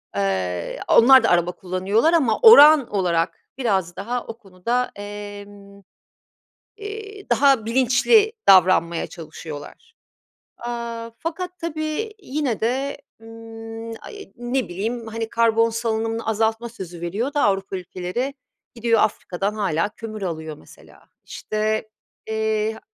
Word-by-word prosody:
Eee, 95 Hz, -3 st, -2 dB
onlar 260 Hz, +3 st, +7 dB
da -, -, +3 dB
araba 175 Hz, 0 st, +2 dB
kullanıyorlar 190 Hz, -, 0 dB
ama 270 Hz, -10 st, +2 dB
oran 310 Hz, -, +9 dB
olarak 175 Hz, -5 st, 0 dB, 0.2 s
biraz 190 Hz, -9 st, 0 dB
daha 240 Hz, +5 st, -4 dB
o 225 Hz, 0 st, -7 dB
konuda, 230 Hz, +5 st, -2 dB
emm, 205 Hz, -1 st, -10 dB, 1.0 s
eee, 415 Hz, -1 st, -8 dB
daha 275 Hz, -5 st, +4 dB
bilinçli 260 Hz, -, +3 dB, 0.2 s
davranmaya 180 Hz, -3 st, +5 dB
çalışıyorlar. 160 Hz, -, -10 dB, 0.6 s
Aaa, 235 Hz, -1 st, -5 dB
fakat 360 Hz, +2 st, -5 dB
tabii 320 Hz, +6 st, -3 dB
yine 280 Hz, -, -2 dB
de, 265 Hz, +5 st, -1 dB, 0.2 s
ımm, 225 Hz, 0 st, -9 dB
ay, 410 Hz, -1 st, -11 dB
ne 240 Hz, -1 st, -2 dB
bileyim, 225 Hz, +6 st, -4 dB
hani, 225 Hz, 0 st, -4 dB
karbon 230 Hz, 0 st, +3 dB
salınımını 225 Hz, 0 st, -2 dB
azaltma 225 Hz, +2 st, 0 dB
sözü 180 Hz, -6 st, -9 dB
veriyor 210 Hz, +11 st, -3 dB
da 290 Hz, -, +1 dB
Avrupa 195 Hz, -1 st, 0 dB
ülkeleri. 185 Hz, +9 st, -4 dB, 0.4 s
Gidiyor, 230 Hz, -1 st, +2 dB
Afrika'dan 195 Hz, 0 st, -1 dB
hâlâ 190 Hz, -3 st, 0 dB
kömür 215 Hz, 0 st, -8 dB
alıyor, 160 Hz, -4 st, -5 dB
mesela. -, -, -19 dB, 0.2 s
İşte, 215 Hz, 0 st, -2 dB, 0.4 s
eee 220 Hz, 0 st, -1 dB
225 Hz, 115 wpm, -22 LUFS, 195-250 Hz, 1.0 s, oran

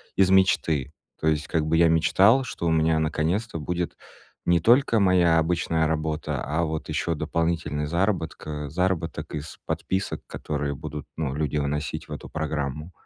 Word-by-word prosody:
из 95 Hz, -1 st, +4 dB
мечты. 80 Hz, -7 st, +3 dB, 0.3 s
То 80 Hz, -, -1 dB
есть, 75 Hz, -1 st, +1 dB
как 80 Hz, -2 st, 0 dB
бы 80 Hz, +1 st, +2 dB
я 85 Hz, 0 st, +6 dB
мечтал, 95 Hz, +10 st, +4 dB
что 85 Hz, -8 st, -4 dB
у -, -, +2 dB
меня 80 Hz, 0 st, +3 dB
наконец-то 80 Hz, +7 st, -1 dB
будет 85 Hz, +3 st, -3 dB, 0.5 s
не 85 Hz, 0 st, +4 dB
только 115 Hz, -, +4 dB
моя 90 Hz, -4 st, +4 dB
обычная 80 Hz, -1 st, +1 dB
работа, 80 Hz, 0 st, -2 dB
а, 80 Hz, +3 st, 0 dB
вот 80 Hz, -1 st, -3 dB
ещё 80 Hz, +2 st, -1 dB
дополнительный 80 Hz, -2 st, -1 dB
заработка 80 Hz, -4 st, -2 dB
заработок 90 Hz, +2 st, -2 dB
из 75 Hz, +1 st, -6 dB
подписок, 95 Hz, +1 st, -2 dB
которые 75 Hz, -1 st, -3 dB
будут, 75 Hz, +1 st, -7 dB
ну, 75 Hz, -5 st, -2 dB
люди 75 Hz, 0 st, -1 dB
вносить 75 Hz, -1 st, -2 dB
в -, -, -14 dB
эту -, -, -8 dB
программу. 75 Hz, 0 st, -3 dB
80 Hz, 155 wpm, -25 LUFS, 75-85 Hz, 0.5 s, я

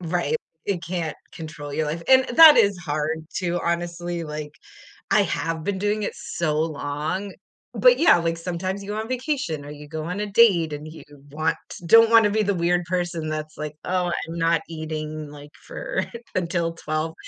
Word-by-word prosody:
Right, 175 Hz, -, -1 dB, 0.3 s
it 185 Hz, -4 st, -2 dB
can't 170 Hz, -3 st, -3 dB, 0.2 s
control 155 Hz, -3 st, -8 dB
your 155 Hz, +1 st, -1 dB
life, 160 Hz, +3 st, -3 dB
and 260 Hz, 0 st, +7 dB
that 320 Hz, -2 st, +10 dB
is 200 Hz, -3 st, +4 dB
hard 155 Hz, 0 st, -3 dB
to 175 Hz, -1 st, -1 dB
honestly, 170 Hz, 0 st, -2 dB
like, 150 Hz, -1 st, -6 dB, 0.6 s
I -, -, +5 dB
have 165 Hz, 0 st, -2 dB
been 200 Hz, -2 st, -1 dB
doing 210 Hz, +2 st, 0 dB
it -, -, -2 dB
so 155 Hz, -3 st, -2 dB
long, 155 Hz, +5 st, -3 dB, 0.4 s
but -, -, +5 dB
yeah, 335 Hz, -, +6 dB
like, 165 Hz, 0 st, -1 dB
sometimes 185 Hz, +3 st, -4 dB
you 200 Hz, -, -7 dB
go 210 Hz, -, -3 dB
on 220 Hz, +1 st, -4 dB
vacation 255 Hz, -, -2 dB
or 145 Hz, -, -9 dB
you 150 Hz, 0 st, -10 dB
go 155 Hz, 0 st, -5 dB
on 180 Hz, +5 st, -4 dB
a 210 Hz, -, -1 dB
date 195 Hz, -7 st, +4 dB
and 150 Hz, +1 st, -6 dB
you 160 Hz, -, -11 dB, 0.3 s
want 155 Hz, +3 st, 0 dB, 0.3 s
don't 225 Hz, +4 st, +7 dB
wanna 225 Hz, -2 st, +6 dB
be 215 Hz, +1 st, +1 dB
the 200 Hz, 0 st, 0 dB
weird 175 Hz, 0 st, +1 dB
person 175 Hz, -3 st, -2 dB
that's 155 Hz, 0 st, -5 dB
like, 150 Hz, 0 st, -5 dB
"Oh, 180 Hz, -1 st, 0 dB
I'm 170 Hz, -1 st, -4 dB
not 165 Hz, -1 st, +2 dB
eating," 155 Hz, -1 st, -5 dB
like, 145 Hz, 0 st, -12 dB, 0.2 s
"for -, -, -3 dB, 0.3 s
until 170 Hz, -2 st, -1 dB
12," 155 Hz, 0 st, -3 dB
170 Hz, 185 wpm, -23 LUFS, 155-195 Hz, 0.6 s, that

